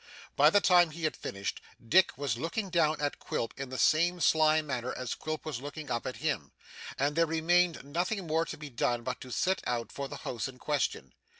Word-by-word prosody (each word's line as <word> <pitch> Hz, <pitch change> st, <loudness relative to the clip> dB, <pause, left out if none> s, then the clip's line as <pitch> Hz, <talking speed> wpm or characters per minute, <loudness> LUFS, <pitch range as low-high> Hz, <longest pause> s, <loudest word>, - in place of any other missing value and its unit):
By -, -, +7 dB
the 205 Hz, -, +4 dB
time 175 Hz, -3 st, +5 dB
he 160 Hz, +2 st, -9 dB
had 155 Hz, -, 0 dB
finished, 100 Hz, 0 st, -5 dB, 0.3 s
Dick 185 Hz, 0 st, +4 dB
was 140 Hz, -2 st, -1 dB
looking 170 Hz, -, -3 dB
down 160 Hz, -3 st, +2 dB
at 145 Hz, -1 st, -2 dB
Quilp 115 Hz, -, -3 dB
in 135 Hz, -1 st, -6 dB
the 130 Hz, -, -5 dB
same 175 Hz, +6 st, +3 dB
sly 155 Hz, -1 st, +4 dB
manner 125 Hz, -4 st, -3 dB
as 125 Hz, -1 st, -3 dB
Quilp 155 Hz, 0 st, -5 dB
was 145 Hz, -6 st, -4 dB
looking 145 Hz, 0 st, -7 dB
up 120 Hz, -, -1 dB
at -, -, -4 dB
him, -, -, -2 dB, 0.4 s
and 145 Hz, +2 st, +1 dB
there 165 Hz, 0 st, +3 dB
remained 170 Hz, +2 st, +2 dB
nothing 175 Hz, +7 st, -2 dB
more 160 Hz, +1 st, +1 dB
to -, -, -7 dB
be 150 Hz, -2 st, -8 dB
done 120 Hz, 0 st, 0 dB
but 125 Hz, +1 st, -4 dB
to 130 Hz, -, -9 dB
set 190 Hz, +8 st, +1 dB
out 120 Hz, -1 st, -2 dB
for 140 Hz, -1 st, -4 dB
the -, -, -7 dB
house 120 Hz, 0 st, -4 dB
in 130 Hz, -1 st, -10 dB
question. 145 Hz, 0 st, -2 dB
155 Hz, 215 wpm, -30 LUFS, 130-170 Hz, 0.4 s, By